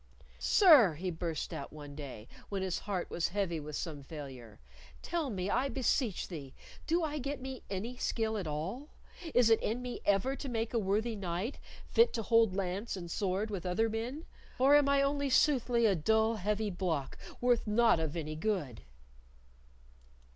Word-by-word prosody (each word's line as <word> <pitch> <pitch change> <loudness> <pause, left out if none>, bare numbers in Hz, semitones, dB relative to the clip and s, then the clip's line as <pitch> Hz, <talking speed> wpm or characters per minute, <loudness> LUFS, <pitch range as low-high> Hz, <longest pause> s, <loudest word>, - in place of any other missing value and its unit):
"Sir," 290 - +6
he 180 +4 -3
burst 165 -2 -4
out 140 - -6
one 145 -2 -9
day, 135 -7 -8 0.2
when 195 -2 -2
his 185 -2 -1
heart 185 -3 -2
was 170 - 0
heavy 185 -4 -1
with 150 0 -7
some 155 -3 -4
failure, 135 -7 -9 0.4
"tell 335 -5 -1
me, 190 -4 -3
I 255 +6 +1
beseech 255 -5 0
thee, 145 -7 -8 0.3
do 335 +2 +2
I 300 -1 -2
get 280 +2 -3
me 260 -1 -6
any 205 +5 -3
of 250 - -13
skill 220 -1 0
at 185 - -4
all? 185 - -4 0.5
Is 240 -2 +5
it 225 - +5
in 225 +3 -1
me 250 -1 -5
ever 205 +7 +2
to 275 - -6
make 225 -1 -2
a 235 - +2
worthy 215 +3 0
knight, 190 +5 -3 0.3
fit 465 +1 +4
to 225 - -2
hold 225 -3 +4
lance 195 +3 -2
and 170 -2 -7
sword 200 +3 -1
with 195 -4 -4
other 190 +5 +1
men, 240 +8 -4 0.3
or 270 +3 +5
am 290 -1 +5
I 280 0 +4
only 280 0 0
soothly 250 -4 +3
a 210 - +5
dull 220 +6 +2
heavy 210 +1 -1
block, 170 -7 -2 0.2
worth 245 -2 +2
naught 225 -3 +4
of 160 0 -2
any 155 -1 -4
good?" 155 - -2
210 Hz, 180 wpm, -32 LUFS, 170-245 Hz, 0.5 s, Sir